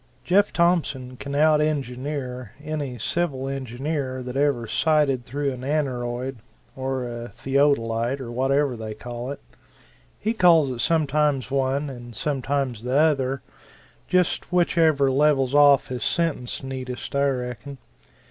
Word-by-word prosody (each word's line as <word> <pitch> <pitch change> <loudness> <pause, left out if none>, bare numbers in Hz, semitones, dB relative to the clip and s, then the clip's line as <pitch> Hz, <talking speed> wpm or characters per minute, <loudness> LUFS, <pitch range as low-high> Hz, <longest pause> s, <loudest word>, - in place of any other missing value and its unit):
Jeff 200 +3 +3
Thompson 150 -7 +1
can 140 +2 -6
out 155 +1 +4
engineer 130 -4 -3
any 145 -5 -4
civil 135 +2 -1
engineer 135 0 -3
that 125 0 -6
ever 140 -4 +1
sighted 140 +1 +1
through 140 +2 -1
an 125 - -8
aneroid, 130 -3 -2 0.4
or 130 -1 -2
a 120 0 -6
theodolite, 130 -1 +1
or 120 -3 -6
whatever 135 +2 +1
they 110 -1 -6
call 120 +2 -6
it 140 - -5 0.8
he 220 +2 -1
calls 165 - +5
it 125 - -5
sometimes 150 -2 +1
one 135 +1 0
and 120 -3 -8
sometimes 135 -3 -1
the 125 +2 0
other 135 -4 +2 0.6
just 180 -1 +1
whichever 160 -6 +3
levels 135 -1 +3
off 145 -2 +6
his 125 -3 -4
sentence 160 -9 -1
neatest, 130 -1 -6
I 140 0 +3
reckon. 125 +2 -5
135 Hz, 130 wpm, -24 LUFS, 125-150 Hz, 0.8 s, off